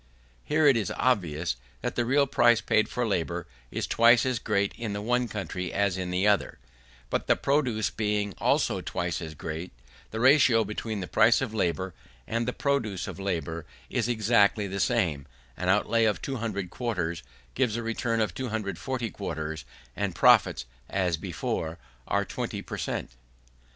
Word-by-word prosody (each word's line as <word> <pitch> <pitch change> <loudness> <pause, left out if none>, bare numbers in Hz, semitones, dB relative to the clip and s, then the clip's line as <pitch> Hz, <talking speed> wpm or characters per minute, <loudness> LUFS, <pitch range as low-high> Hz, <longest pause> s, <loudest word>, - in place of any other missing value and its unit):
Here 155 +1 +2
it 140 -3 +7
is 110 -5 -1
obvious, 85 - +1 0.3
that - - -1
the 120 - 0
real 140 +4 +4
price 120 -4 +4
paid 110 - +2
for 125 - -1
labour 85 -4 -1 0.2
is - - -2
twice 115 +1 +5
as 130 -3 0
great 100 -3 0
in 115 -3 -4
the 100 - -3
one 125 +2 +1
country 95 -4 -4
as 100 -2 +1
in 90 -1 -3
the 90 +3 +1
other; 105 -1 +2 0.5
but - - -1
the - - +5
produce 130 -7 +1
being 105 -2 -1
also - - +2
twice - - -3
as 80 -1 -7
great, 80 +4 -5 0.4
the 110 - -5
ratio 130 -3 +5
between 105 -1 -4
the 90 - -4
price 115 +2 +5
of 130 -5 -3
labour 95 -2 -1 0.3
and 115 +1 -1
the - - +1
produce 125 -10 -1
of - - -7
labour 85 -4 -3 0.2
is 115 - 0
still 120 - +1
exactly 105 -2 +3
the 100 0 -4
same: 90 - +1 0.3
an 90 - -2
outlay 110 +3 +3
of 105 -2 +1
200 110 -8 -3
quarters 90 -9 -2 0.3
gives 125 -4 +1
a 115 - -3
return 115 0 -1
of 105 -5 0
240 115 0 -3
quarters, 80 -5 -5 0.3
and - - -2
profits, - - +5 0.2
as 90 -3 +1
before, 80 +1 -3 0.3
are - - +1
20 - - -4
per - - -6
cent. - - -3
105 Hz, 170 wpm, -27 LUFS, 90-120 Hz, 0.5 s, it